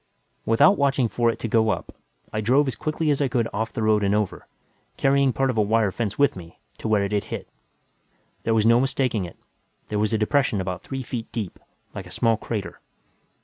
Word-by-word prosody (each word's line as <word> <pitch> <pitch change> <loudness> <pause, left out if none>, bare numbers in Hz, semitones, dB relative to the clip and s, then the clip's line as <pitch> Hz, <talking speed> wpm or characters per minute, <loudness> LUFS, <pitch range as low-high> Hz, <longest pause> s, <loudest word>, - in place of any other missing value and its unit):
Without 145 - +5
watching 135 -3 +2
for 120 +1 +1
it 115 - -2
to - - -4
go 110 0 +3
up, - - -3 0.4
I 110 - -1
drove 135 +7 +3
as 130 - -2
quickly 155 +5 -1
as 145 - 0
I 140 - +3
could 125 -3 0
off 110 +2 -2
the 110 - -3
road 110 -1 +3
and 100 +1 +2
over 105 -3 -2 0.5
carrying 140 0 +3
part 135 +1 +1
of 115 - -2
a - - +5
wire 105 -1 +2
fence 105 0 -3
with 140 -1 +3
me 85 -3 -11 0.2
to - - -4
where 105 -2 +3
it 100 - -2
had 105 -1 0
hit. - - -6 0.9
There 115 - +1
was 110 -1 +3
no 115 +1 +6
mistaking 130 -6 0
it; 85 - -11 0.5
there 105 - -1
was 105 +1 +1
a 110 - +2
depression 110 0 +1
about 90 -1 -3
three 135 -1 -5
feet 115 -2 -6
deep, 105 -6 -5 0.3
like - - -7
a - - -13
small 115 -1 +2
crater. 110 -2 -5
115 Hz, 220 wpm, -24 LUFS, 105-135 Hz, 0.9 s, no